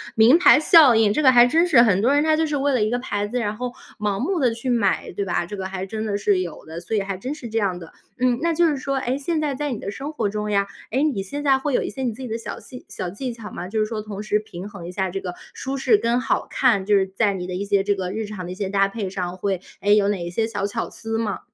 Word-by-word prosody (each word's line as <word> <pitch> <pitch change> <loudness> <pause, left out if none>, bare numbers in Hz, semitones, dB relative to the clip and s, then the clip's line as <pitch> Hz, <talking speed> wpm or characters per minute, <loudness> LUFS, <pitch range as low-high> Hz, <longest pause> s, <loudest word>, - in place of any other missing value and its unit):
名 235 +9 +6
牌 355 - +7
效 310 - +7
应， 220 -2 +4
这 305 - +1
个 265 -3 +6
还 240 -1 +7
真 330 +8 +3
是。 260 -9 +6
很 200 -5 +3
多 250 +6 +3
人 290 - +3
他 315 0 +3
就 320 0 +1
是 295 -1 -1
为 280 0 +1
了 250 - +2
一 215 - +1
个 245 - 0
牌 205 -5 -3
子， 245 +4 -2
然 210 -2 -2
后 250 +2 -4 0.3
盲 205 -2 -1
目 345 +7 -1
地 255 -5 +3
去 235 +3 -4
买， 230 -4 +1
对 200 - -1
吧？ 175 -2 -1
这 205 - -7
个 190 -1 -4
还 190 0 -5
真 220 +2 -4
的 200 -1 -1
是 205 -2 +2
有 175 -3 -7
的， 160 +1 -7
所 220 - -2
以 - - +1
还 195 0 -4
真 255 +9 -4
是 260 -6 -8
这 225 +1 0
样 195 -4 0
的。 165 -2 -12 0.2
嗯， 250 -1 +1
那 335 0 +1
就 340 +1 +3
是 305 - +1
说， 275 0 -2
诶， 260 0 -1
现 315 +3 -1
在 295 -3 -1
在 295 +1 -3
你 235 - -4
的 200 - -5
生 275 +8 -6
活 230 -8 -1
中 210 +1 -3
呀， 200 -1 +2 0.2
诶， 265 +5 +1
你 265 -11 0
现 285 +10 -5
在 275 -2 +4
会 285 +1 -2
有 - - +2
一 - - -3
些 265 - -6
你 245 - 0
自 245 - -11
己 255 - -5
的 225 0 -3
小 230 - -7
技 250 - -12
小 180 - -4
技 245 +8 -5
巧 225 -2 -9
吗？ 180 +1 -6
就 220 +2 -1
是 215 - +2
说 215 0 -4
同 205 -1 -7
时 210 0 +1
平 190 -3 -9
衡 200 -5 -10
一 - - -6
下 190 0 -1
这 195 +2 -4
个 180 -2 -5 0.2
舒 270 0 -4
适 255 -4 +4
跟 235 +3 +1
好 - - 0
看， 225 -8 +2
就 205 +1 +3
是 190 -1 +1
在 200 +2 0
你 180 -2 -5
的 180 - -4
一 190 - -2
些 200 -1 +2
这 205 0 +1
个 185 -2 -4
日 220 +2 -3
常 205 -3 -7
的 175 - -6
一 - - -9
些 200 0 -3
搭 195 0 +2
配 200 -2 -4
上， 185 -1 -4
会， 190 -1 -2 0.2
诶， 205 +1 +4
有 200 -1 +3
哪 200 -3 -1
一 - - -4
些 220 +6 0
小 205 -3 -2
巧 200 - -3
思 225 0 -4
吗？ 225 -2 -2
215 Hz, 340 characters per minute, -22 LUFS, 195-260 Hz, 0.3 s, 牌